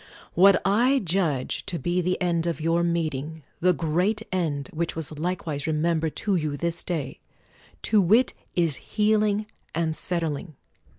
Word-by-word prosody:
What 195 +2 +6
I 240 +8 +4
judge 170 - -1
to 175 - -2
be 175 +2 0
the 180 +1 0
end 170 -2 0
of 165 -1 -2
your 165 +2 +1
meeting, 160 -3 -2 0.2
the 180 +1 +4
great 180 +6 0
end, 155 -7 -1
which 170 +1 -2
was 155 -1 -4
likewise 160 -4 -2
remembered 160 0 0
to 200 -2 +2
you 155 -4 -1
this 170 +2 -2
day; 155 -7 -3 0.6
to 215 -2 +4
wit, 220 +8 +4 0.2
is 165 -5 +2
healing 210 0 +1 0.3
and 160 -1 0
settling. 165 -2 -1
170 Hz, 145 wpm, -25 LUFS, 155-185 Hz, 0.6 s, What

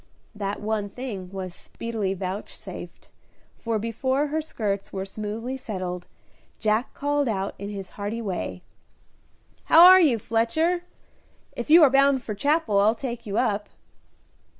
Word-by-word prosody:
That 205 -1 -3
one 210 -1 -2
thing 200 -6 -6
was 190 -2 -5
speedily 215 -3 -4
vouchsafed, 190 +2 -7 0.5
for 230 -1 -1
before 260 +6 -1
her 315 +2 0
skirts 205 -10 -3
were 190 -1 -4
smoothly 215 +6 -5
settled, 185 -7 -5 0.5
Jack 215 +2 0
called 290 -1 0
out, 195 -3 -1
in 200 +1 -5
his 195 -3 -7
hearty 205 +3 -4
way, 195 -6 -4 1.0
"How 325 +2 +8
are 370 +1 +10
you, 280 -9 +4
Fletcher? 315 - 0 0.7
If - - -5
you 325 +1 +9
are 280 - +6
bound 275 -1 +4
for 215 - -4
Chapel 260 -2 +1
I'll 215 +3 +4
take 235 -1 -5
you 200 +1 -2
up." 210 -4 0
220 Hz, 140 wpm, -25 LUFS, 200-265 Hz, 1.0 s, are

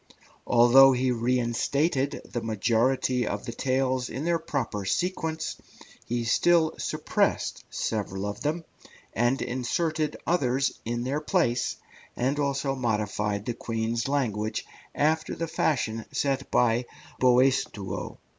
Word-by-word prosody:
Although 125 +3 +7
he 125 0 +1
reinstated 125 +4 0
the 120 - -4
majority 120 +3 +1
of - - -3
the 120 - -4
tales 130 0 0
in 135 +6 -4
their 170 -1 +2
proper 115 -10 -3
sequence, 160 - -2 0.5
he 120 0 -1
still 160 +6 +3
suppressed - - -1
several 100 -3 -3
of 105 0 -5
them, 160 +3 -2 0.5
and 120 +4 +2
inserted 155 +5 -1
others 135 -5 +1
in 120 +1 -2
their 140 +4 -1
place, 120 -5 +1 0.4
and 135 +4 0
also 140 -1 0
modified 105 -4 -1
the 120 - -1
Queen's 115 0 -2
language 110 -7 -1 0.3
after 155 +1 +1
the 165 - -3
fashion 115 -8 0
set 140 -2 -1
by 120 0 +2 0.3
Boaistuau. 125 -6 +1
125 Hz, 120 wpm, -27 LUFS, 115-140 Hz, 0.5 s, Although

